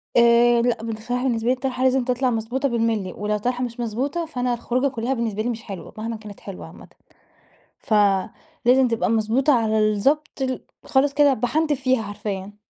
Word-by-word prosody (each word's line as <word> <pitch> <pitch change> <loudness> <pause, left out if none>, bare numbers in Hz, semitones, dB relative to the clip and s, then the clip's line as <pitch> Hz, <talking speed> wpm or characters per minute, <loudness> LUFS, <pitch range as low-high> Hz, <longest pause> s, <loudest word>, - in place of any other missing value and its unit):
آآ 235 0 +5
لأ 235 -2 0
بن 225 -1 -3
بصراحة 245 +3 -3
بالنسبة 235 -3 0
لي - - +5
الطرحة 255 0 -3
لازم 260 0 +3
تطلع 250 +1 0
مضبوطة 245 +4 -1
بالمللي، 225 -5 -1
ولو 210 +1 -2
الطرحة 245 +4 -1
مش 240 0 -5
مضبوطة 260 +9 -2
فأنا 250 -5 -2
الخروجة 245 +3 0
كلها 255 0 -2
بالنسبة 225 -4 -2
لي 245 - -1
مش 225 -2 -4
حلوة 195 -4 -8
مهمًا 225 +1 -4
كانت 215 -2 -11
حلوة 195 -2 -9
عامةً. - - -14 0.9
فلازم 215 +5 +1
تبقى 230 -1 0
مضبوطة 230 +6 +2
على 220 -3 +2
الضبط 280 +8 0
ال 260 -1 -1 0.2
خالص 275 +1 +2
كده 290 -1 +5
باحنتف 285 +4 0
فيها 255 -2 +2
حرفيًا. 205 -1 -6
240 Hz, 175 wpm, -23 LUFS, 220-260 Hz, 0.9 s, آآ